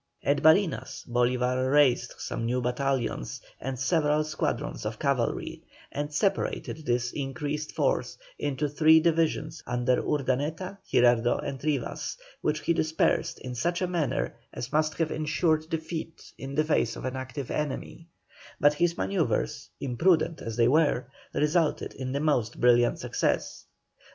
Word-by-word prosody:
At 140 0 +2
Barinas, 160 +3 +3
Bolívar 125 +1 +1
raised 130 -4 +3
some - - -4
new 120 +2 0
battalions 125 - -1 0.2
and 130 0 -4
several 150 +1 +2
squadrons 155 0 -2
of - - -3
cavalry, - - -1 0.3
and 145 +1 -3
separated 160 -2 -1
this 120 0 +1
increased 145 +2 -4
force - - 0 0.2
into 145 +1 -1
three 155 +2 +6
divisions 160 -1 0
under 125 +1 +1
Urdaneta, 150 +7 -1
Girardot, 120 -1 +4
and 135 -1 -5
Rivas, 145 - -2 0.2
which 150 0 0
he 170 - +2
dispersed 160 -1 +1
in 125 - -5
such 170 +9 -1
a 185 - +1
manner 165 -7 -1 0.2
as 120 - -6
must 155 0 +2
have 165 -2 0
ensured 155 +1 0
defeat 160 0 -5
in 135 +1 -7
the 155 - +3
face 155 -7 +1
of - - -7
an 130 0 -2
active 130 +1 -5
enemy, 150 +3 -4 0.5
but 145 0 +5
his 170 +3 +1
manœuvres, 95 +1 -1
imprudent 160 +5 +2
as 115 -1 -5
they 115 -1 +5
were, 145 -2 +3 0.3
resulted 150 +1 +1
in 130 -1 -5
the 140 - -1
most 145 -7 0
brilliant 120 0 +4
success. - - -1
145 Hz, 140 wpm, -28 LUFS, 125-155 Hz, 0.5 s, three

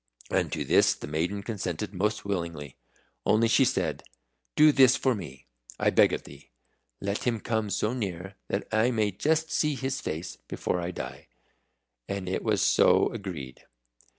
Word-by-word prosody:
And - - +1
to - - -2
this - - +4
the - - -8
maiden 85 +7 -2
consented 95 -5 -4
most 105 +3 -1
willingly. 85 -8 -4 0.5
Only 115 +2 +3
she 130 +4 +4
said, 90 - 0 0.5
"Do 150 0 +7
this 130 -3 +6
for 130 -1 +1
me, 75 - -8 0.3
I - - +3
beg - - +5
of - - -3
thee. 70 -1 -14 0.5
Let 100 +1 -3
him 120 -3 +1
come 110 -1 -1
so 105 +3 0
near 95 -5 -4
that 100 - -2
I 110 +2 +3
may 110 -4 +1
just 160 - 0
see 150 -2 +1
his 135 0 -3
face 80 +2 -5
before 90 - -2
I 85 - -3
die." 90 - -7 0.8
And 100 -2 -3
it 95 - -1
was - - +1
so - - +4
agreed. 85 - -7
100 Hz, 165 wpm, -28 LUFS, 85-115 Hz, 0.8 s, Do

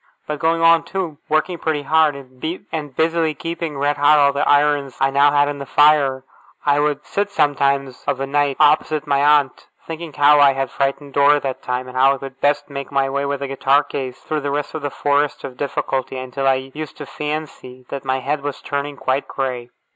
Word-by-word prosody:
But 150 -1 -4
going 165 +2 +1
on, 165 0 +6
too, 180 -6 -5
working 160 +3 0
pretty 155 -3 -1
hard, 155 0 +3
and 145 +2 -7
busily 160 -1 +1
keeping 165 -3 -5
red 145 +1 0
hot 145 +1 +5
all 140 -1 +4
the 140 - 0
irons 145 -2 +2
I 135 0 +2
now 140 +1 +5
had 145 0 +3
in 145 -1 -4
the 140 - -7
fire, 145 -3 +3 0.4
I 145 0 +3
would 150 0 -1
sit 200 0 -2
sometimes 140 -6 0
of - - 0
a 135 - -1
night, 140 0 0
opposite 155 0 +3
my 140 -1 +1
aunt, 145 -2 +2 0.2
thinking 165 0 -7
how 145 +1 +5
I 140 -1 +6
had 135 -1 -3
frightened 140 +1 -2
Dora 145 +1 +4
that 135 -2 -4
time, 125 0 -3
and 125 - -11
how 135 +2 +4
I - - -8
could 135 0 -10
best 145 0 +1
make 140 -1 -7
my 135 -1 +1
way 140 +1 -1
with 140 0 -3
a - - -3
guitar 135 +1 +2
case 130 -3 -5
through 155 -1 -4
the 145 +1 -3
forest 145 +1 0
of 130 - -7
difficulty, 135 -1 -3
until 130 +1 -3
I 135 0 0
used 155 0 -7
to 145 - -7
fancy 150 -4 -6
that 140 -1 -5
my 130 0 -1
head 145 +2 -2
was 145 0 -5
turning 140 0 -4
quite 135 +1 -1
grey. 125 -3 -4
145 Hz, 205 wpm, -20 LUFS, 135-150 Hz, 0.4 s, on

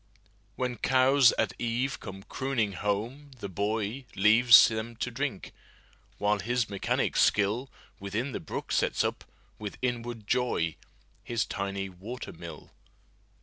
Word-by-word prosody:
When 125 -1 -2
cows 130 +1 +5
at - - 0
eve 120 +4 -1
come 95 0 -9
crooning 130 -5 -1
home, 105 +9 -3
the 105 - -5
boyLeaves 110 +3 +4
them 110 +1 -4
to 125 +2 -3
drink, 130 -4 -4 0.6
while 105 0 +1
his 120 0 -1
mechanic 100 - 0
skillWithin 105 +2 0
the - - -3
brook - - -6
sets - - +1
up, - - -2 0.4
with 105 -2 -6
inward 120 -3 -3
joy, 115 -10 0 0.5
His 120 -1 -1
tiny 100 -1 -3
water 100 +7 -8
mill. 85 -2 -10
115 Hz, 120 wpm, -29 LUFS, 100-125 Hz, 0.6 s, cows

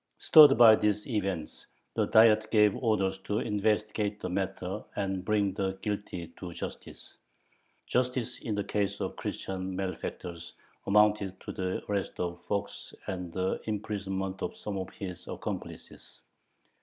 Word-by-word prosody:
Stirred 150 -3 +8
by 115 -2 +9
these 105 -1 +1
events, 95 -9 -3 0.3
the - - +1
Diet 110 -1 +5
gave 105 -2 +4
orders 95 -5 0
to 105 +2 -2
investigate 105 -1 0
the - - -4
matter 95 +1 -3
and 95 -2 -2
bring 100 -1 +1
the 95 0 -2
guilty 95 -5 -4
to 90 -2 -6
justice. - - -8 0.7
Justice 125 -1 -1
in 110 - -3
the 100 - -1
case 100 -1 -1
of 95 -2 -2
the - - -21
Christian 95 -1 -4
malefactors 90 -2 -5 0.3
amounted 105 -2 +3
to - - -6
the 95 0 -3
arrest 100 -2 -2
of 85 0 -3
Fox 100 -1 -4
and 90 -2 -4
the 95 +2 -1
imprisonment 100 -3 -3
of - - -4
some 105 - -5
of 95 - -5
his 90 -4 -8
accomplices. - - -7
100 Hz, 145 wpm, -29 LUFS, 95-105 Hz, 0.7 s, by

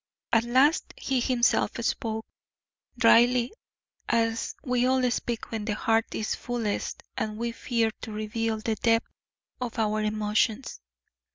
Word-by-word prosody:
At 230 0 +4
last 265 +7 +3
he 265 -2 0
himself 245 -1 +2
spoke, 220 -1 -2 0.7
dryly, 240 +1 +5 0.6
as 230 -1 0
we 250 -2 +1
all 255 -1 +2
speak 235 -1 -3
when 220 -2 -3
the 210 -2 -1
heart 225 +1 +1
is 215 - -1
fullest 235 -4 -3
and 215 -1 -3
we 235 +1 -2
fear 230 -1 0
to 220 - -6
reveal 220 +1 -2
the 220 +1 -1
depth 230 0 +2 0.5
of 245 -2 -4
our 215 -1 +1
emotions. 215 +3 0
230 Hz, 130 wpm, -27 LUFS, 220-245 Hz, 0.7 s, dryly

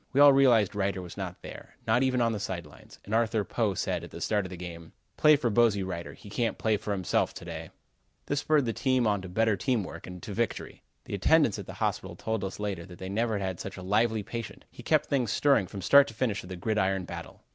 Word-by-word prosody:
We 135 - +2
all 145 -1 +9
realized 120 -8 +4
Reiter 100 -1 -1
was 90 -2 -8
not - - -6
there: - - -10
not 115 +2 +3
even 130 -2 +2
on 115 -1 +3
the 110 - -3
side 90 -4 -4
lines, 75 - -16
and 105 - -6
Arthur 110 -2 +2
Poe 105 -2 -1
said, - - -2
at - - -8
the - - -9
start 105 -3 0
of - - -12
the 90 - -8
game: 85 -2 -9 0.2
"Play 150 0 +6
for 125 -5 0
Bosey 105 -3 +3
Reiter. 85 -2 -5
He - - -14
can't 115 +3 -1
play 110 -1 +1
for 105 - -5
himself 95 -3 0
to - - -9
day." - - -6 0.6
This 145 - 0
spurred 145 -3 +2
us 115 +4 -3 0.2
on 105 -2 +1
to 95 - -8
better 110 +3 +2
team 115 +2 0
work - - -9
and 90 0 -8
to 105 - -6
victory. 115 +1 -3 0.2
The - - -7
attendants 115 - +3
at - - -8
the - - -7
hospital - - -2
told 110 -2 -3
us 95 +1 -5
later 100 -5 -3
that 90 -2 -12
they 95 +1 -6
never 110 +2 0
had 100 - -2
had 95 -2 -4
such 95 - -6
a 95 - -7
lively 110 +3 +1
patient. 115 +2 -7
He - - -11
kept - - +2
things 125 -6 0
stirring 135 -9 +3
from 95 0 -7
start 140 +6 +7
to 115 - -10
finish 110 -4 -1
of 90 - -12
the 95 - -5
gridiron 95 -1 0
battle. - - -9
105 Hz, 255 wpm, -28 LUFS, 95-120 Hz, 0.6 s, all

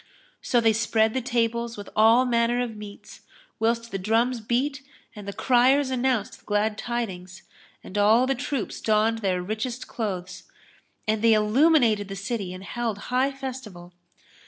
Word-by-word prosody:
So 245 - +2
they 225 -1 +3
spread 220 0 +1
the 260 - -1
tables 235 -1 -1
with 205 - -8
all 225 +4 +5
manner 235 0 +1
of 240 -3 -3
meats, 210 -1 -11 0.4
whilst 230 +1 0
the 195 - -3
drums 230 +5 +1
beat 260 +5 -1 0.3
and 205 -1 -10
the - - -3
criers 260 +5 +3
anounced 255 -4 -1
the - - -28
glad 210 +1 0
tidings, 190 -6 -5 0.4
and 185 - -11
all 220 +5 +5
the 270 - +1
troops 270 -2 -4
donned 220 +1 +2
their 185 -4 -1
richest 220 +5 -4
clothes; 185 -6 -5 0.6
and 215 0 0
they 230 0 +5
illuminated 220 -1 +3
the 195 - -6
city 200 -1 -4
and 185 +1 -8
held 230 0 -3 0.2
high 260 +2 +2
festival. 250 -10 -8
225 Hz, 160 wpm, -25 LUFS, 210-245 Hz, 0.6 s, all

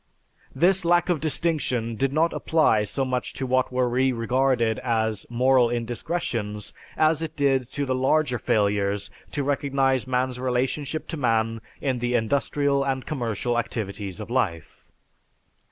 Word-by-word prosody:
This 190 +2 +3
lack 175 +1 +3
of 175 -4 +2
distinction 145 -7 -1
did 135 +4 0
not 160 +3 +2
apply 135 -10 +2
so 135 +5 -1
much 125 -1 -2
to 130 - -4
what 130 0 +1
were 125 0 +1
re 130 +2 +2
regarded 120 -1 +1
as 110 -3 -1
moral 125 0 +3
indiscretions 115 -4 -3 0.2
as 155 0 +3
it 160 -1 -4
did 135 -3 +1
to 145 -1 -1
the 130 - 0
larger 130 0 +1
failures 100 -1 0 0.2
to 145 - -2
recognize 135 -3 +1
man's 125 0 -1
relationship 130 +4 -1
to 160 - -3
man 115 -3 0 0.2
in 130 -3 0
the 120 +1 0
industrial 140 +4 +1
and 135 -1 -2
commercial 120 -4 -1
activities 105 -4 -4
of 110 +2 -7
life. 95 - -2
130 Hz, 145 wpm, -25 LUFS, 115-140 Hz, 0.2 s, This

